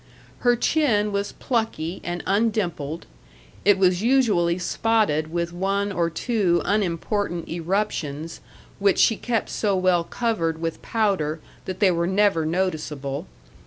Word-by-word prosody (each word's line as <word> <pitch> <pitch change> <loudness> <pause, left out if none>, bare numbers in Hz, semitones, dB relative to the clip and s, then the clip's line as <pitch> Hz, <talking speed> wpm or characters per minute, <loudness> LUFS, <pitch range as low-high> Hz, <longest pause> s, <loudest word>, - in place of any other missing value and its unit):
Her 245 -1 +3
chin 230 -6 +2
was 200 0 -2
plucky 220 -8 -2
and 175 0 -4
undimpled; 195 -8 -1 0.6
it 205 -1 +5
was 185 -1 +3
usually 215 -9 +3
spotted 180 -5 +1
with 170 0 -2
one 195 +3 -1
or 170 -3 0
two 185 -1 +1
unimportant 200 -2 -1
eruptions, 165 -3 -2 0.4
which 200 -1 +3
she 225 - +4
kept 230 0 -2
so 205 -3 0
well 185 -2 +3
covered 170 -7 -1
with 165 -1 -3
powder 190 -9 0 0.3
that 185 +1 -6
they 195 -3 +5
were 170 0 0
never 190 -4 +2
noticeable. 155 -4 -2
185 Hz, 125 wpm, -24 LUFS, 170-210 Hz, 0.6 s, it